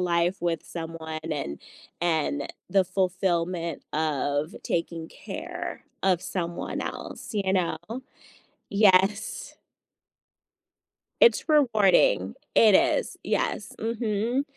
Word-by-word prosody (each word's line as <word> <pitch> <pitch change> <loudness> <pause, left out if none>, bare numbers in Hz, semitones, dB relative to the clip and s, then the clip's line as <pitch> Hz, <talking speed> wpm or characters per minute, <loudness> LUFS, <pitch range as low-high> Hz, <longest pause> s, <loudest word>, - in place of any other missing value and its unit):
life 175 +1 +2
with 170 -2 -1
someone, 160 -1 -6
and 105 - -3 0.4
and 155 -4 0 0.2
the 190 +1 +3
fulfillment 180 -2 -1
of 150 -1 0
taking 165 -1 -2
care - - -6 0.2
of 185 -3 +3
someone 175 -2 -3
else, - - -6
you 195 -3 0
know? 180 -4 +1 0.9
Yes. 200 +1 +3 1.6
It's 470 -8 +5
rewarding, 270 - +4 0.2
it 215 -3 +7
is, - - +3
yes, 205 - -1
mhm, 230 +2 0
180 Hz, 90 wpm, -26 LUFS, 165-205 Hz, 1.6 s, it